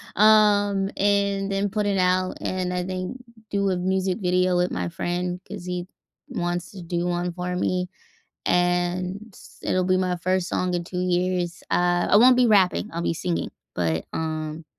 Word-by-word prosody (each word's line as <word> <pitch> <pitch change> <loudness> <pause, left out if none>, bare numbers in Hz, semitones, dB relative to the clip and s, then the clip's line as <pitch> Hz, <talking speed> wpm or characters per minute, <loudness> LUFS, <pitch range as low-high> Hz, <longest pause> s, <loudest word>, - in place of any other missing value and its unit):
um, 205 -2 +4
and 200 -1 +1
then 195 +1 0
put 210 +1 -1
it 200 -1 +1
out, 185 0 +1
and 185 -1 -2
I 180 0 -1
think 185 +6 -4 0.3
do 200 -1 +1
a 180 - 0
music 190 +2 0
video 180 0 +2
with 180 0 +1
my 90 -1 -2
friend, 180 - -3
'cause 175 - -7
he 180 -1 -3 0.4
wants 175 0 -3
to 190 -3 -9
do 170 +1 -2
one 175 0 -1
for 180 +1 -3
me, 180 0 -1 0.6
and 180 +3 0 0.3
it'll 185 0 +1
be 185 0 +2
my 185 -1 0
1st 185 +1 0
song 180 -1 -1
in 175 -1 -1
2 180 +1 -4
years, 180 -1 0
uh, 175 0 +2
I - - +6
won't 250 +2 +7
be 250 0 +5
rapping, 205 -1 +3
I'll 170 +1 -3
be 170 - 0
singing, 175 +1 -2 0.2
but, 80 -2 -1
um, 155 0 -4
180 Hz, 175 wpm, -24 LUFS, 175-195 Hz, 0.6 s, won't